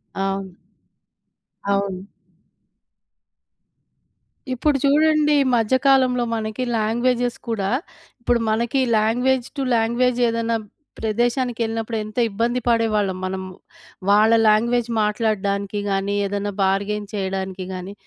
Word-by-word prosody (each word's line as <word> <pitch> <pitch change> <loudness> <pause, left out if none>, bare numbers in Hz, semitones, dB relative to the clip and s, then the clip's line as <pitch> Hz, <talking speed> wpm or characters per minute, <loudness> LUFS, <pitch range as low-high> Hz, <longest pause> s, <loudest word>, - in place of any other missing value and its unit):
అవును. 195 -1 -3 1.2
అవును. 195 -1 -1 2.5
ఇప్పుడు 275 +3 +1
చూడండి 300 +1 +4
ఈ - - +4
మధ్య 225 +2 +2
కాలంలో 255 -2 +4
మనకి 220 +2 -3
లాంగ్వేజెస్ 240 +2 0
కూడా, 200 -4 -1 0.5
ఇప్పుడు 240 0 +1
మనకి 235 +5 +1 0.2
లాంగ్వేజ్ 245 +4 +1
టు 275 - -1
లాంగ్వేజ్ 235 +2 +1
ఏదన్నా 230 0 0 0.4
ప్రదేశానికెళ్ళినప్పుడు 230 0 -1
ఎంత 215 +2 -11
ఇబ్బంది 230 +4 -1
పడేవాళ్ళం 215 -5 +1
మనము. 190 0 -4 0.6
వాళ్ళ 210 +2 +5 0.2
లాంగ్వేజ్ 235 +2 +2
మాట్లాడ్డానికి 205 -2 -1
గాని, 195 +1 0
ఏదన్నా 205 +1 -3
బార్‌గైన్ 200 +2 0
చేయడానికి 190 -1 -3
గాని, 185 +2 -6
220 Hz, 95 wpm, -21 LUFS, 200-240 Hz, 2.5 s, వాళ్ళ